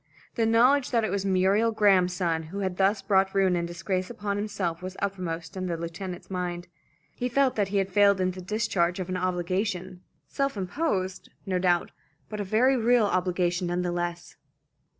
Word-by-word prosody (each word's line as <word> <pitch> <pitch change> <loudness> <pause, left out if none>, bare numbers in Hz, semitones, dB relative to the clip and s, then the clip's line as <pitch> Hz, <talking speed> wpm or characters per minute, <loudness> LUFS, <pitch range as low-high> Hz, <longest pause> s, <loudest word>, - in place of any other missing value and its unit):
The 225 -2 +1
knowledge 250 +4 +4
that 230 -3 +1
it 220 - -1
was 200 0 -1
Muriel 195 +4 +3
Graham's 195 -4 +3
son 170 -3 0
who 200 +3 -5
had 185 -2 -2
thus 195 +1 +2
brought 195 0 +2
ruin 190 -2 +3
and 170 -1 -1
disgrace 185 +2 -3
upon 205 -4 -3
himself 200 -5 -3
was 185 +1 -7
uppermost 180 -4 -4
in 185 -1 -3
the 170 -2 -2
lieutenant's 175 +2 -6
mind. 180 -2 -4 0.5
He 250 - -3
felt 265 +1 +2
that 205 -2 +1
he 200 +1 -1
had 195 -1 0
failed 200 0 +4
in 185 0 +1
the 185 0 -8
discharge 190 -3 0
of 185 -1 -4
an 185 - -1
obligation, 185 +1 -2 0.3
self 275 -4 -2
imposed, 190 - -2 0.2
no 185 -2 0
doubt, 175 -1 +1 0.4
but 210 - -5
a - - -1
very 230 +7 +3
real 240 -1 +3
obligation 180 -1 0
none 175 +1 -1
the 175 - -1
less. 175 0 -4
190 Hz, 190 wpm, -27 LUFS, 180-210 Hz, 0.5 s, knowledge